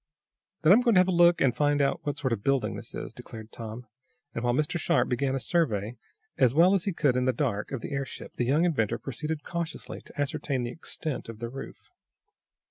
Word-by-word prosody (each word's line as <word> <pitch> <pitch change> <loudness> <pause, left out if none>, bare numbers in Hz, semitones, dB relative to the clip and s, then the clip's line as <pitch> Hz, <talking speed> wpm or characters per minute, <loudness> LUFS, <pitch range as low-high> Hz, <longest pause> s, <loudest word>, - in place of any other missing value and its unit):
"Then 160 +4 +8
I'm 230 - +6
going 235 -4 +3
to - - +7
have 185 - +4
a - - +2
look 175 0 +5
and 125 -3 +3
find 145 +1 +2
out 140 -1 +2
what 145 0 -2
sort 130 -4 0
of 115 - -2
a - - -23
building 135 +3 +1
this - - -8
is," - - -6
declared 110 0 -10
Tom, 115 +1 -7 0.5
and, 115 - -4
while 120 - +2
Mr. 155 +4 0
Sharp 170 +1 +2
began 130 +2 0
a - - -1
survey, 120 - 0 0.4
as 130 0 +4
well 175 +4 +6
as 195 -3 +2
he 200 - +1
could 145 -7 +1
in 125 0 +1
the 130 - +4
dark, 115 -6 -2
of 135 -4 -3
the - - -6
airship, 140 -1 -5
the 120 - +1
young 150 +7 +3
inventor 115 -9 +1
proceeded 150 +4 -4
cautiously 170 0 -5
to - - -14
ascertain 140 -2 -1
the 120 - -3
extent 155 -4 -5
of 115 - -7
the 120 +1 -5
roof. 135 +2 -10
140 Hz, 230 wpm, -28 LUFS, 120-160 Hz, 0.5 s, Then